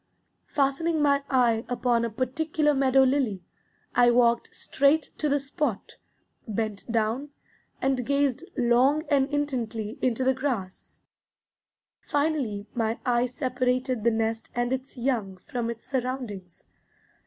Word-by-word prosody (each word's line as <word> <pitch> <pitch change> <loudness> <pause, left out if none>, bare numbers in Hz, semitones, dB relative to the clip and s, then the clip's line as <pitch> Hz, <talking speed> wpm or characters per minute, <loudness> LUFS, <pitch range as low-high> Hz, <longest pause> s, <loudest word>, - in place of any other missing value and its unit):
Fastening 300 +4 +1
my 285 -1 +3
eye 235 -4 +3
upon 240 -1 +1
a 235 - 0
particular 295 +6 0
meadow 270 -1 +4
lily, 255 -9 +1 0.5
I 245 0 +5
walked 235 -1 +3
straight 285 +3 +2
to 300 - +1
the 285 +1 +2
spot, 275 -5 -3 0.5
bent 215 0 -3
down, 230 +5 0 0.5
and 265 -2 +1
gazed 280 +1 +1
long 255 +5 +3
and 275 -2 +3
intently 240 -7 -2
into 255 0 +1
the 265 +1 +3
grass. 250 -9 -4 1.0
Finally 285 -9 -1
my 225 -1 -1
eye 245 0 +2
separated 255 -1 -1
the 235 - +5
nest 225 0 -1
and 240 +1 0
its 260 +1 -5
young 230 -7 -1
from 235 +5 -4
its 230 -1 -6
surroundings. 245 -9 -4
250 Hz, 125 wpm, -26 LUFS, 230-275 Hz, 1.0 s, I